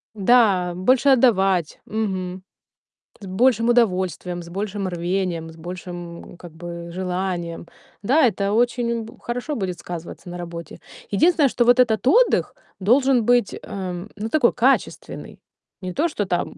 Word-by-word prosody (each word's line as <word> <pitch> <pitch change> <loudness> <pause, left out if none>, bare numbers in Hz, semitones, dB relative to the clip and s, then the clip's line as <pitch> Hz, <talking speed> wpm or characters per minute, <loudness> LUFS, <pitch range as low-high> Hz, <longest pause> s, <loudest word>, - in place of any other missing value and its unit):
Да, 200 -4 +3
больше 255 +9 +3
отдавать, 195 - +3
мгм, 190 -4 -3 0.8
с - - -8
большим 230 +4 +2
удовольствием, 185 -6 +1
с 170 - -12
большим 200 +1 -3
рвением, 175 -1 -2
с 160 - -13
большим, 175 0 -8
как 175 -1 -11
бы, 170 +1 -8
желанием. 180 -2 -3 0.4
Да, 270 +7 +4
это 200 -2 -1
очень 235 0 +1
б 225 - -11
хорошо 245 +5 -4
будет 185 -6 -3
сказываться 175 +1 -8
на 175 - -6
работе. 170 -2 -8 0.3
Единственное, 300 - +4
что 240 0 +1
вот 245 +1 +5
этот 225 -3 +3
отдых 480 - +3 0.2
должен 250 +4 +3
быть, 245 -3 +3
эм, 185 0 -6
ну 215 +2 -4
такой, 245 -1 +3
качественный. 255 +3 -1 0.4
Не 185 -1 -5
то, 320 - +1
что 210 -9 -2
там 180 -2 -2
195 Hz, 140 wpm, -22 LUFS, 175-240 Hz, 0.8 s, вот